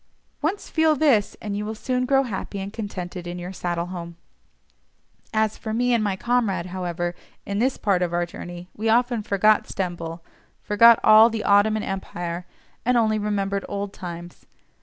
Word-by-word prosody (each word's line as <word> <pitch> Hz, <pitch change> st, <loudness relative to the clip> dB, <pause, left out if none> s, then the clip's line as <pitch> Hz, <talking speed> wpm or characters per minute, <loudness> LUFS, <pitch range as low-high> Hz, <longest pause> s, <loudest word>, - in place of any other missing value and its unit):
Once 340 Hz, +7 st, -2 dB
feel 320 Hz, -1 st, +3 dB
this, 260 Hz, -9 st, +2 dB
and 205 Hz, -1 st, -3 dB
you 205 Hz, -, -2 dB
will 215 Hz, +1 st, -4 dB
soon 250 Hz, +3 st, -1 dB
grow 270 Hz, 0 st, +4 dB
happy 200 Hz, -4 st, -5 dB
and 195 Hz, +2 st, -6 dB
contented 185 Hz, -5 st, -6 dB
in 175 Hz, +1 st, -5 dB
your 180 Hz, +2 st, -6 dB
saddle 175 Hz, -2 st, -2 dB
home. 170 Hz, -2 st, -7 dB, 1.2 s
As 220 Hz, -1 st, 0 dB
for 220 Hz, -1 st, -4 dB
me 245 Hz, +1 st, +2 dB
and 230 Hz, -2 st, +2 dB
my 200 Hz, -2 st, 0 dB
comrade, 205 Hz, -5 st, 0 dB
however, 175 Hz, -1 st, -2 dB, 0.3 s
in 200 Hz, 0 st, -2 dB
this 255 Hz, +3 st, +1 dB
part 195 Hz, -4 st, +1 dB
of 175 Hz, -1 st, 0 dB
our 175 Hz, 0 st, 0 dB
journey 175 Hz, +1 st, -9 dB
we 220 Hz, +1 st, -1 dB
often 240 Hz, 0 st, +2 dB
forgot 210 Hz, +1 st, +3 dB
Stamboul, 170 Hz, -3 st, -4 dB, 0.4 s
forgot 230 Hz, +2 st, +6 dB
all 220 Hz, +1 st, +8 dB
the 220 Hz, -1 st, -3 dB
Ottoman 210 Hz, +2 st, +3 dB
Empire, 175 Hz, -2 st, -5 dB, 0.4 s
and 250 Hz, +1 st, +2 dB
only 220 Hz, -2 st, +2 dB
remembered 200 Hz, -1 st, -1 dB
old 200 Hz, 0 st, -4 dB
times. 175 Hz, -1 st, -9 dB
205 Hz, 170 wpm, -24 LUFS, 180-225 Hz, 1.2 s, all